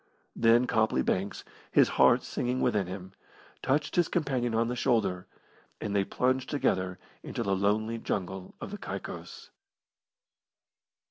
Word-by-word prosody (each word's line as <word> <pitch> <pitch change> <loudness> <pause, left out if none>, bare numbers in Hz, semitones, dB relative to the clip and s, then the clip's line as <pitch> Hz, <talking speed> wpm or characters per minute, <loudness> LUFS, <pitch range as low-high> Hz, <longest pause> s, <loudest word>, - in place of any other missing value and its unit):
Then 120 +2 +5
Copley 110 - +2
Banks, 95 +2 -1 0.3
his - - +5
heart - - +5
singing 125 +1 -2
within 100 -3 +1
him, 95 0 -7 0.5
touched 145 +3 0
his 175 -2 +3
companion 130 -8 0
upon 115 +1 +2
the 125 - -2
shoulder, 110 -8 +1 0.5
and 100 - -3
they 100 - +3
plunged 130 +5 0
together 95 -10 0 0.2
into - - -4
the 100 -1 +1
lonely 110 +4 0
jungle 95 -3 -4
of - - -7
the 205 - -6
Caicos. - - -7
110 Hz, 135 wpm, -29 LUFS, 95-125 Hz, 0.5 s, Then